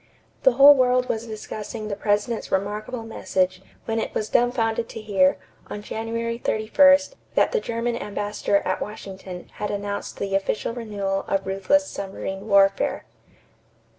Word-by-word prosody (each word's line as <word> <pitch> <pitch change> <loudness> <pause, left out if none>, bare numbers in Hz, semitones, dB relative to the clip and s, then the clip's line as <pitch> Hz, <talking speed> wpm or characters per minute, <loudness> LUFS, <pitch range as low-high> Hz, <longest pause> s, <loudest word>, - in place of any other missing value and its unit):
The - - +5
whole 285 +1 +9
world 250 -2 +2
was 225 +1 -2
discussing 215 0 -6
the 205 - -3
President's 210 +3 -1
remarkable 210 +5 -2
message, 185 -4 -1 0.2
when 225 0 -1
it - - -4
was 215 - -1
dumbfounded 235 -2 +1
to - - -7
hear, 195 -3 +2 0.3
on 205 - -7
January 230 +2 -3
31, 280 +7 +5 0.4
that - - +3
the 475 - +1
German 235 - -2
ambassador 205 -1 -1
at - - -1
Washington 190 -3 -8
had 210 - -3
announced 200 0 -4
the 200 -1 -3
official 195 +3 -1
renewal 200 -4 -3
of 195 0 0
ruthless 195 +10 +2
submarine 195 -3 -6
warfare. 195 -1 +3
215 Hz, 140 wpm, -24 LUFS, 200-230 Hz, 0.4 s, whole